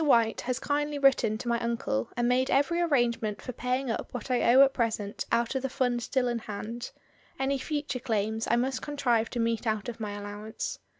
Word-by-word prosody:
White 230 -6 +3
has 250 0 -2
kindly 295 +2 -1
written 270 -6 +3
to 240 - -7
my 235 0 +1
uncle 230 - -1
and 240 0 +2
made 255 +1 +2
every 330 +6 +2
arrangement 240 -9 +1
for 255 - -6
paying 250 +1 -1
up - - -4
what 245 +2 -4
I 250 - +2
owe 265 +3 +9
at 270 -1 +3
present 220 -4 -2
out 235 +1 +2
of 265 - -1
the 270 - -2
funds 245 -2 0
still 260 -2 +1
in 240 -1 -1
hand; 225 +3 -6 0.5
any 270 +1 0
future 290 -2 -3
claims 220 -2 -1
I 235 - +4
must 255 +2 0
contrive 245 -6 +1
to 245 - -4
meet 230 0 0
out 215 +1 -1
of 235 - -7
my 210 -2 -3
allowance. 205 +1 -5
240 Hz, 205 wpm, -29 LUFS, 225-265 Hz, 0.5 s, owe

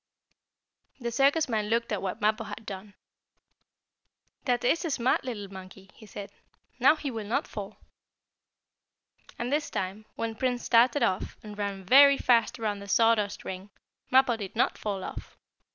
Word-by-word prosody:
The 235 -2 -3
circus 285 +5 +3
man 215 -3 -1
looked 230 +1 0
at 210 - -1
what 195 +4 -4
Mappo 215 +2 +1
had 225 - -8
done. 200 0 -8 1.5
"That 245 -2 +1
is 325 +9 +2
a 335 - -2
smart 255 -3 +1
little 225 -6 -5
monkey," 190 0 -12
he 215 - -15
said. 200 -1 -8 0.5
"Now - - +6
he 290 -3 -4
will 220 -3 -5
not 225 - 0
fall." 205 0 -7 1.6
And 245 +3 -2
this 295 0 0
time, 195 +3 -4
when 230 0 -3
Prince 245 +1 -1
started 245 +4 +4
off, 185 - -1
and 210 -1 -9
ran 200 -2 -4
very 280 +6 +7
fast 235 -1 +2
around 210 -3 -2
the 200 - -10
sawdust 215 -1 +2
ring, 190 +2 -6 0.4
Mappo 260 -2 +4
did 200 -1 -7
not 235 - +2
fall 200 -3 -4
off. - - -8
220 Hz, 160 wpm, -28 LUFS, 200-250 Hz, 1.6 s, very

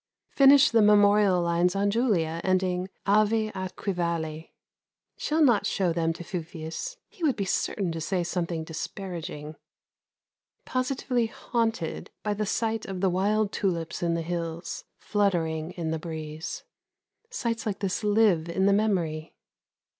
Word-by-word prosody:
Finished 275 +1 +7
the 230 -1 +5
memorial 205 -3 +5
lines 170 +2 +2
on 200 +1 +2
Julia 180 -9 +1
ending 185 0 0 0.2
"Ave 215 +2 +3
atque 190 +1 -4
Vale." 165 -2 -2 0.7
Shall 315 +1 +1
not 240 -7 +4
show 180 -4 +1
them 165 -1 +1
to 175 - -8
Fufius. 170 - -5
He 445 -5 -21
would 290 -5 +3
be 200 - -2
certain 190 -1 -1
to 165 0 -4
say 180 +2 0
something 170 -2 -2
disparaging. 160 -2 -6 1.1
Positively 255 -2 0
haunted 225 -6 -2
by 210 - 0
the 210 0 -2
sight 225 0 -1
of 190 -1 -4
the 190 -2 +3
wild 205 +3 +1
tulips 170 -5 -2
in 170 -1 +1
the 165 - -2
hills, 170 0 -4
fluttering 165 -6 0
in 165 -2 -3
the 160 - -2
breeze. 155 0 -6 0.7
Sights 230 - -2
like 200 - -1
this 195 +1 -2
live 205 -6 +3
in 190 +3 +1
the 200 - +5
memory. 175 -7 0
185 Hz, 140 wpm, -27 LUFS, 165-215 Hz, 1.1 s, Finished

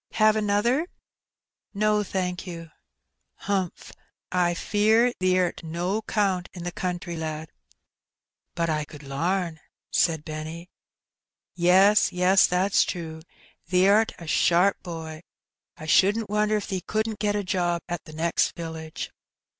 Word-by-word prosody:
Have 215 -1 +4
another?" 215 +9 +1 0.9
"No, 210 +1 +2
thank 185 -1 -3
you." 165 -2 -8 0.6
"Humph. 190 -3 -3 0.4
I 175 -1 +2
fear 220 +6 +3
thee'rt 185 -1 +1
no 175 +6 -2
'count 195 -4 0
in 175 - -8
the 175 - -3
country, 175 -1 -4
lad." 160 -1 -5 1.0
"But 170 -1 0
I 155 -1 0
could 150 0 -12
lam," 165 +4 -2 0.3
said 160 -3 +1
Benny. 160 +3 -7 0.8
"Yes, 190 +4 +5
yes, 180 +2 +4
that's 185 +2 +2
true; 160 -2 -5 0.5
thee'rt 200 +5 +4
a 170 - -10
sharp 175 +6 +3
boy. 160 -3 -7 0.6
I 155 - -9
shouldn't 200 +6 +3
wonder 210 0 +2
if 210 - -4
thee 190 -2 -3
couldn't 215 +1 -2
get 205 0 0
a 205 - -1
job 175 -3 -1
at 175 -1 -4
t' - - -11
next 165 +2 0
village." 160 -1 -6
180 Hz, 130 wpm, -25 LUFS, 165-205 Hz, 1.0 s, Yes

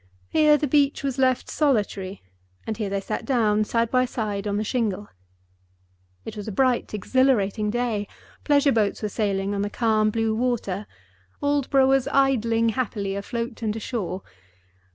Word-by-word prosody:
Here 300 -1 +5
the 295 - -1
beach 285 +1 +2
was 270 -1 -2
left 255 -1 +2
solitary, 205 -9 -1 0.4
and 220 - -3
here 210 -2 -3
they 195 0 -2
sat - - -4
down, 215 -5 +2
side 230 +1 0
by 255 0 +3
side, 210 -4 -3
on 205 0 -1
the 210 - 0
shingle. 210 -4 -2 1.2
It - - -7
was 210 -1 -7
a - - -3
bright, 255 +3 +1
exhilarating 215 -2 +1
day; 225 -3 -1 0.4
pleasure 285 -1 +4
boats 215 -2 0
were 210 - 0
sailing 200 -2 -1
on 200 - -1
the 205 - -1
calm 215 -1 +2
blue 225 0 0
water; 220 -4 -1 0.6
Aldborough 280 -2 +3
was 270 -1 +3
idling 230 -4 +2
happily 210 -4 -2
afloat 230 +4 -4
and 215 -2 -1
ashore. 205 -5 -4
225 Hz, 155 wpm, -24 LUFS, 205-260 Hz, 1.2 s, Here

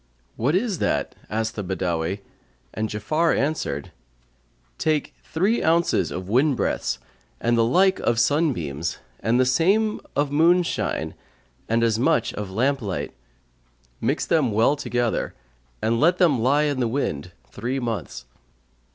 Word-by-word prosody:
"What 135 +8 +1
is 200 -3 0
that?" - - 0 0.2
asked 110 +2 -1
the 105 - -3
Badawi; 90 0 -2 0.5
and 110 0 -2
Ja'afar 155 +12 +1
answered, 140 - -2 0.9
"Take 155 -2 0
three 195 +8 +1
ounces 165 - +2
of 90 0 -5
wind 130 +6 +3
breaths 60 0 -1 0.4
and 120 0 +1
the 115 - +4
like 185 +11 +3
of 120 -1 +1
sunbeams 110 - 0 0.2
and 115 +4 +1
the 130 - +4
same 195 +11 +2
of 145 0 +1
moonshine 170 +4 +2 0.6
and 115 +1 +2
as 115 -1 +2
much 130 -3 +2
of 105 -2 -5
lamp 130 +8 +1
light; 100 -4 -4 0.9
mix - - 0
them 150 -8 +2
well 115 +7 +3
together 120 -5 -1 0.5
and 115 +1 +2
let 170 +3 +4
them 160 -10 +3
lie 140 +5 +3
in 145 -3 0
the 120 - +1
wind 90 - -2 0.2
three 125 - -3
months. 115 - -4
125 Hz, 140 wpm, -24 LUFS, 105-155 Hz, 0.9 s, the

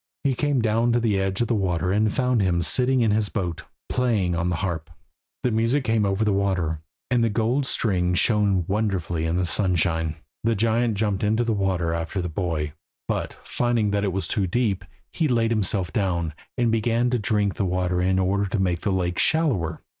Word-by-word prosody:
He 140 -2 +2
came 140 -2 0
down 115 +2 +2
to 120 - +3
the 110 -4 +1
edge 95 +2 -1
of 120 - +1
the 120 - +1
water 90 -4 0
and 105 +2 +2
found 125 -2 +1
him 85 -3 +1
sitting 130 +4 +2
in 110 -2 +3
his 105 -1 +1
boat, 90 -5 -3 0.2
playing 110 -8 +1
on 85 +1 0
the 90 - 0
harp. 85 -2 -3 0.5
The 125 - +1
music 115 +5 +1
came 110 -3 +1
over 100 +3 0
the 105 - +2
water, 90 -6 0 0.3
and 120 -2 +3
the 115 - +2
gold 120 +6 0
strings 90 -7 0
shone 100 -5 +2
wonderfully 95 -6 -1
in 85 +2 0
the 90 - +1
sunshine. 85 -4 0 0.3
The 115 0 +2
giant 115 +2 +1
jumped 100 -1 -1
into 110 +3 +2
the 115 -1 0
water 95 -5 0
after 85 +3 -3
the 90 -1 -2
boy; 80 -3 -2 0.3
but - - -2
finding 120 -4 0
that 100 0 0
it 100 - 0
was 95 -2 -2
too 100 -3 0
deep, 100 -2 0 0.3
he 160 - 0
laid 115 -3 +1
himself 95 -6 +1
down, 85 -6 0 0.2
and 120 -2 +2
began 115 +2 +1
to 125 - +1
drink 105 -2 +1
the 100 - -1
water 90 -1 0
in 95 +1 +2
order 100 +2 +1
to 100 +2 -2
make 90 -3 0
the 100 - 0
lake 90 -2 -1
shallower. 110 - +1
100 Hz, 205 wpm, -24 LUFS, 90-115 Hz, 0.5 s, to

